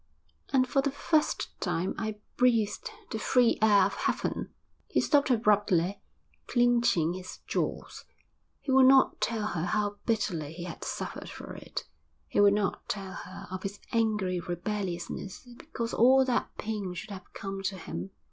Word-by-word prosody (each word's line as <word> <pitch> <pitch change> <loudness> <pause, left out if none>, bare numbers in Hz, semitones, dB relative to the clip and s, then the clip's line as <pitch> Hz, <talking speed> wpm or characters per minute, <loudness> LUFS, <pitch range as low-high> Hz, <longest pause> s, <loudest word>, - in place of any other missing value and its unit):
And 255 -2 +4
for 275 +2 +2
the 280 - 0
first 300 +2 +1
time 180 +3 -1
I 215 -1 -3 0.2
breathed 230 -4 +2 0.2
the - - -2
free 245 -2 +3
air 205 -3 +6
of 200 - -1
heaven.' - - -1 0.4
He - - +1
stopped 285 -3 +3
abruptly, 205 -5 +2 0.5
clenching 240 -9 +3
his 185 0 -7
jaws. - - -3 0.6
He 275 - -3
would 260 0 +7
not 265 0 +5
tell 220 -2 0
her 165 0 -2
how 205 -1 0
bitterly 175 -10 0
he 170 +1 -7
had 175 - -7
suffered - - -5
for - - -8
it, - - -6 0.4
he - - 0
would 205 0 +6
not 205 -2 -2
tell 195 -2 -3
her 185 - -8
of 185 0 -4
his 200 +1 -5
angry 210 -5 +1
rebelliousness 180 +2 -4
because 230 -1 -5
all 260 +3 +6
that 250 -2 0
pain 205 -4 -3
should 180 - -7
have 185 -2 -9
come 195 0 -5
to 195 0 -2
him. 95 - -6
205 Hz, 155 wpm, -29 LUFS, 185-235 Hz, 0.6 s, would